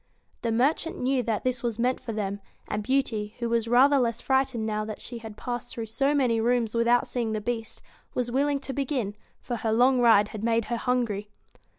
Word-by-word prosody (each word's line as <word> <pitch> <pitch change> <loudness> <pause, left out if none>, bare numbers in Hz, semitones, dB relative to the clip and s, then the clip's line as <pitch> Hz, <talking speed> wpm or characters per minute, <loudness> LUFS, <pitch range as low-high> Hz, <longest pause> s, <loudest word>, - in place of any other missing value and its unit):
The 230 - -1
merchant 275 +8 +1
knew 260 0 +1
that 225 -3 -2
this 255 -1 -1
was 235 -3 -2
meant 250 +2 +1
for 230 - -6
them; 200 -2 -3 0.3
and 210 - -2
Beauty, 225 -4 -1
who 235 - -2
was 230 -1 +1
rather 270 +4 +5
less 235 -2 0
frightened 265 -4 +1
now 215 -1 -1
that 215 -1 -6
she 240 - -6
had 220 -2 -9
passed 245 -1 -4
through 230 - -3
so 275 +6 +1
many 240 -5 +2
rooms 235 -1 +1
with 230 0 +1
out 245 0 +4
seeing 230 -3 -2
the 215 - -1
Beast, 225 +1 -4 0.3
was 245 -1 -1
willing 280 +2 +1
to 270 - -4
begin, 260 -7 -2 0.3
for 240 - -3
her 220 0 -1
long 250 +3 +4
ride 215 -3 +5
had 215 -1 -7
made 230 -1 +2
her - - 0
hungry. 230 -5 -1
235 Hz, 215 wpm, -27 LUFS, 220-255 Hz, 0.3 s, rather